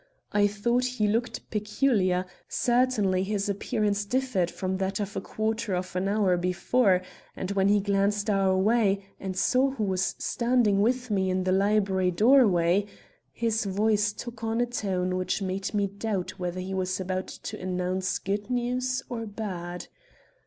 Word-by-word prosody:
I 205 0 +4
thought 235 +5 0
he 210 - +2
looked 230 +4 -1
peculiar; 210 -4 +1 0.2
certainly 240 -7 +2
his 200 +1 -1
appearance 205 0 0
differed 245 -5 0
from 190 +1 -3
that 190 +1 -2
of 205 -1 -4
a - - -2
quarter 220 -2 -2
of 185 0 -4
an 185 +1 0
hour 200 -3 +2
before, 185 +2 +2 0.3
and 185 - -4
when 195 -1 +2
he 205 0 +4
glanced 200 +1 +1
our 195 -2 +2
way 200 -1 +2
and 190 -1 -5
saw 260 +7 +3
who 265 -5 -3
was 190 -1 0
standing 235 -5 +2
with 250 +2 0
me 190 -2 +1
in 185 0 0
the 185 - 0
library 195 -1 +2
doorway, 200 -3 +4 0.4
his 225 -2 -1
voice 205 +1 +2
took 230 +1 -9
on 225 +1 0
a 245 - +3
tone 185 -6 -1
which 185 +2 -1
made 190 +1 -2
me 205 -2 +1
doubt 200 -1 -4
whether 180 0 -3
he 190 +1 -5
was 185 0 -1
about 185 0 -2
to - - -7
announce 185 0 -1
good 205 +3 -3
news 250 +1 -1
or 230 -4 -5
bad. 180 -5 -5
200 Hz, 160 wpm, -27 LUFS, 185-225 Hz, 0.4 s, I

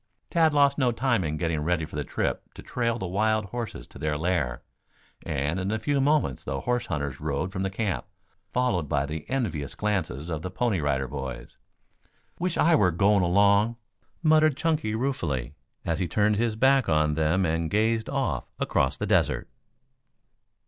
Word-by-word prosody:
Tad 165 -2 +4
lost 140 -1 +3
no 125 -3 +3
time 120 -3 +1
in 75 -1 -2
getting 80 -1 -1
ready 80 +1 0
for 75 - -11
the 75 - -1
trip - - -3
to - - -10
trail 115 -2 -1
the 95 - -4
wild 110 +3 +1
horses 115 +3 -6
to - - -13
their 75 -1 -1
lair, 75 -8 -1 0.6
and 75 +6 -1
in 95 +1 -2
a 110 - 0
few 140 +6 0
moments 145 - +1
the 70 +1 -3
horse 120 -1 -1
hunters 70 -4 -3
rode 75 +4 -2
from 95 -1 -4
the 95 - 0
camp, 100 +1 -2 0.4
followed 110 - 0
by 70 -2 +1
the 75 +1 -6
envious 90 - -2
glances 95 -8 -2
of 80 -3 -3
the 90 - -4
Pony 115 -2 0
Rider 70 -3 0
Boys. 65 -1 -7 0.8
"Wish 180 -1 -1
I 170 - +4
were 105 - +5
going 100 +4 +3
along," 100 +5 +4 0.5
muttered 155 -3 +4
Chunky 155 -9 0
ruefully, 85 - -2 0.3
as 85 -2 -1
he 90 - 0
turned 105 +3 +2
his 115 0 0
back 135 +3 +3
on 75 -1 +3
them 80 +5 +2
and 80 0 0
gazed 110 +3 +1
off 130 - -1
across 65 -1 +1
the - - -2
desert. - - +1
95 Hz, 175 wpm, -26 LUFS, 75-120 Hz, 0.8 s, were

